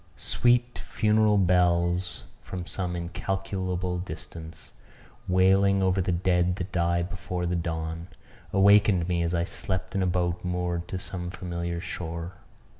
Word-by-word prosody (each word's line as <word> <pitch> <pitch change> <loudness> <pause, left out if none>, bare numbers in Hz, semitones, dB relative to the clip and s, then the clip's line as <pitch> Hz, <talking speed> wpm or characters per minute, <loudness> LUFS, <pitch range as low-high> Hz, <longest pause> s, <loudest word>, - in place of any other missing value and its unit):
Sweet 120 0 +2
funeral 110 -1 +2
bells 90 -1 +2 0.2
from 90 -2 -6
some 90 -1 -2
incalculable 90 0 -3
distance, 80 -1 -8 0.6
wailing 95 +1 +4
over 95 0 +2
the 90 - 0
dead 90 0 +2
that 90 0 -5
die 85 0 +1
before 90 0 -4
the 90 +1 0
dawn, 80 0 -3 0.4
awakened 100 -2 +5
me 90 -1 0
as 85 +1 0
I 85 - +1
slept 95 +1 -2
in 95 - 0
a 95 - +2
boat 90 -1 0
moored 90 -1 -2
to 95 -1 -4
some 90 -1 -4
familiar 85 -2 -4
shore. 85 0 -5
90 Hz, 135 wpm, -27 LUFS, 85-95 Hz, 0.6 s, awakened